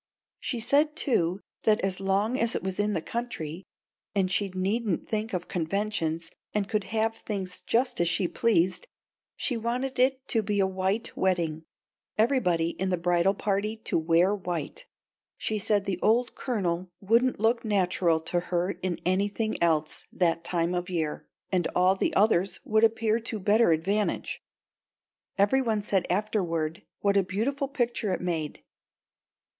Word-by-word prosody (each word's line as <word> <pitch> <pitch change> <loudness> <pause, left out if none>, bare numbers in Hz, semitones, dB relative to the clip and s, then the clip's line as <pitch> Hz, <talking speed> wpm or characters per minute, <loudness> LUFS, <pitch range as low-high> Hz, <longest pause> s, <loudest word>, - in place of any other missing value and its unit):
She 245 - -2
said, 295 +6 +2
too, 190 - +1 0.2
that 215 -1 +3
as 190 -1 -1
long 195 +5 +1
as 230 -2 0
it - - -2
was 190 0 -3
in 205 0 +1
the 165 - -2
country 190 -8 -5 0.5
and 190 -2 +1
she 200 +1 +1
needn't 190 +2 -1
think 215 0 -2
of 180 -2 -2
the - - -28
conventions 165 -2 -2 0.2
and 205 -2 +1
could 215 -2 -1
have 225 0 0
things 190 -4 -5
just 245 -2 +1
as 170 - +2
she 180 0 +1
pleased, 200 - +1 0.5
she 245 - 0
wanted 250 +3 -2
it 260 +1 +3
to 225 - +3
be 205 -1 -1
a 195 - +4
white 190 +3 -1
wedding 165 -4 0 0.5
everybody 190 -9 +2
in 190 +2 -2
the 180 - +1
bridal 175 +3 +2
party 205 +2 -1
to 220 - -1
wear 170 +4 +3
white. 180 - -5 0.5
She 215 -1 -1
said 205 0 +1
the 190 -2 -2
old 240 +3 +2
Colonel 185 -8 -2
wouldn't 230 +5 +2
look 230 +2 +2
natural 180 -5 +2
to 175 +2 0
her 180 +1 +1
in 180 -2 -1
anything 200 +4 0
else 155 -2 +1
that 170 -2 +1
time 170 0 0
of 175 0 -2
year, 160 -4 -2 0.2
and 180 -3 +2
all 185 +1 +4
the - - -1
others 195 -2 +3
would 220 0 +2
appear 225 0 +3
to 225 -1 -4
better 210 +1 +4
advantage. 195 +7 0 1.0
Every 205 +7 +4
one 220 -4 0
said 195 -2 0
afterward 180 -4 -1 0.2
what 200 0 +2
a - - +6
beautiful 250 - -1
picture 240 -6 -1
it - - -1
made. 165 -4 -3
195 Hz, 160 wpm, -27 LUFS, 175-225 Hz, 1.0 s, a